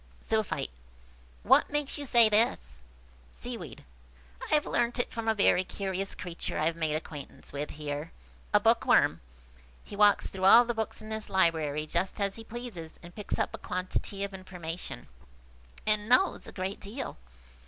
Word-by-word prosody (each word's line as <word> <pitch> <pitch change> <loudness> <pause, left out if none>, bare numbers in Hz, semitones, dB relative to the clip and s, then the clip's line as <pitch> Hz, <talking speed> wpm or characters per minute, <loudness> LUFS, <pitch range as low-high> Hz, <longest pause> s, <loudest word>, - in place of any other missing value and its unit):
Zoophyte. 220 - -1 0.7
"What - - +5
makes 295 -1 -2
you 285 - -5
say 235 -3 +6
this?" 215 - +1 0.5
Seaweed. - - -8 0.6
"I - - -5
have 300 -1 +3
learnt 240 0 0
it 245 - -1
from 230 -1 -4
a 220 - +3
very 195 -2 +4
curious 195 0 -3
creature 175 -2 -5
I 155 - +1
have 165 +1 +1
made 160 -2 -1
acquaintance 150 -3 -7
with 145 +1 -3
here–a 145 - -3
bookworm. - - +3 0.6
He - - -10
walks 205 0 +4
through 190 -1 -2
all 235 +5 +9
the 240 - -1
books 220 -1 -3
in 215 - -9
this 220 0 -4
library 160 -5 +2
just 170 +6 -2
as 200 -1 +1
he 225 - -9
pleases, 220 -9 -8
and 175 +1 -11
picks 210 +1 -3
up - - -1
a - - -6
quantity 185 +2 -3
of 200 0 -4
information, 175 - -7 0.8
and 215 0 +2
knows 375 +10 +3
a - - -8
great 190 +1 -4
deal. 230 +7 -6
190 Hz, 165 wpm, -29 LUFS, 160-220 Hz, 0.8 s, all